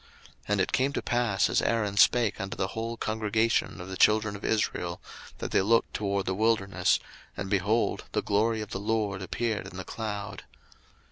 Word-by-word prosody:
02:016:010 -, -, -25 dB, 0.4 s
And 105 Hz, -1 st, +2 dB
it 95 Hz, -, 0 dB
came 135 Hz, +2 st, +1 dB
to -, -, -1 dB
pass, 120 Hz, -5 st, +1 dB
as -, -, +2 dB
Aaron 105 Hz, -4 st, 0 dB
spake 115 Hz, +1 st, +4 dB
unto 95 Hz, 0 st, -5 dB
the 95 Hz, -, -1 dB
whole 115 Hz, +2 st, -4 dB
congregation 110 Hz, 0 st, 0 dB
of 90 Hz, -, -7 dB
the 95 Hz, -, -5 dB
children 105 Hz, +2 st, +3 dB
of 100 Hz, -, -10 dB
Israel, 90 Hz, -5 st, -1 dB, 0.4 s
that -, -, -5 dB
they -, -, +3 dB
looked 115 Hz, +4 st, +2 dB
toward 100 Hz, -2 st, -1 dB
the 95 Hz, -, 0 dB
wilderness, 95 Hz, -3 st, +2 dB, 0.4 s
and, 100 Hz, 0 st, -4 dB
behold, 105 Hz, +4 st, +1 dB
the -, -, 0 dB
glory 110 Hz, +2 st, +1 dB
of 105 Hz, -, -7 dB
the 95 Hz, -, -3 dB
LORD 105 Hz, -2 st, -1 dB
appeared 110 Hz, +3 st, -2 dB
in 90 Hz, -, -10 dB
the 95 Hz, -, -6 dB
cloud. 105 Hz, -2 st, -5 dB
105 Hz, 190 wpm, -28 LUFS, 95-110 Hz, 0.4 s, spake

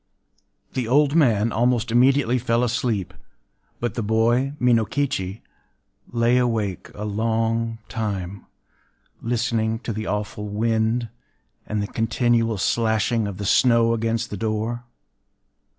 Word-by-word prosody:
The 125 Hz, -3 st, -2 dB
old 140 Hz, +3 st, +3 dB
man 115 Hz, -8 st, +3 dB
almost 120 Hz, 0 st, +1 dB
immediately 125 Hz, +1 st, +3 dB
fell 115 Hz, 0 st, +1 dB
asleep; 115 Hz, -5 st, -1 dB, 0.7 s
but 120 Hz, -3 st, -2 dB
the 120 Hz, -, -3 dB
boy, 115 Hz, +5 st, +2 dB
Minokichi, 115 Hz, -4 st, 0 dB, 0.6 s
lay 120 Hz, +1 st, +2 dB
awake 110 Hz, -7 st, -1 dB
a 105 Hz, -, -5 dB
long 115 Hz, +2 st, 0 dB
time, 100 Hz, -5 st, -4 dB, 0.7 s
listening 115 Hz, -1 st, 0 dB
to 115 Hz, -, -4 dB
the 110 Hz, +1 st, -4 dB
awful 105 Hz, 0 st, -3 dB
wind, 110 Hz, +2 st, 0 dB, 0.6 s
and 105 Hz, -1 st, -1 dB
the -, -, -3 dB
continual 115 Hz, 0 st, +1 dB
slashing 110 Hz, +1 st, +1 dB
of 100 Hz, -2 st, -6 dB
the 100 Hz, -, -4 dB
snow 115 Hz, +1 st, +4 dB
against 115 Hz, 0 st, -1 dB
the 105 Hz, -, -4 dB
door. 110 Hz, +3 st, -2 dB
115 Hz, 120 wpm, -23 LUFS, 110-120 Hz, 0.7 s, snow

